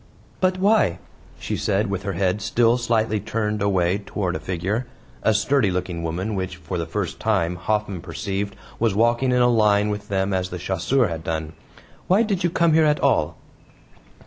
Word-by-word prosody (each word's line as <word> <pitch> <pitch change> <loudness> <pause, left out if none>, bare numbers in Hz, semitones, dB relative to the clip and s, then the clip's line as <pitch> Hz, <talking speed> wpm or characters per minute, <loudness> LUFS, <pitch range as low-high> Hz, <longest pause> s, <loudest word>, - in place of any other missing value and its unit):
"But 185 0 +2
why," 195 - +3 0.4
she - - -3
said 100 +1 0
with 95 -1 -2
her 100 0 -3
head 95 +3 0
still 115 +3 +3
slightly 110 -2 +1
turned 105 0 -2
away 95 -1 +2
toward 95 -3 -3
a - - -2
figure 95 +7 -2 0.3
a - - +3
sturdy 110 +2 +2
looking 90 -2 -3
woman, 90 +6 -3
which, 95 -2 -3
for 90 0 -5
the 85 - -3
first - - -3
time, 85 +1 +1
Hoffman 100 0 -2
perceived 100 +3 -4 0.2
was 110 -4 +1
walking 120 +4 +2
in 125 0 +4
a - - +5
line 105 -3 +3
with 105 0 -4
them 95 0 0
as 90 -1 -1
the 90 - -5
chasseur 95 +8 +1
had 80 -2 -5
done 80 -1 -3 0.5
"why 195 +5 +4
did 200 -4 -1
you 175 - +3
come 170 -1 +2
here 160 0 +5
at 150 -1 +2
all?" 85 - +1
100 Hz, 185 wpm, -23 LUFS, 90-115 Hz, 0.5 s, a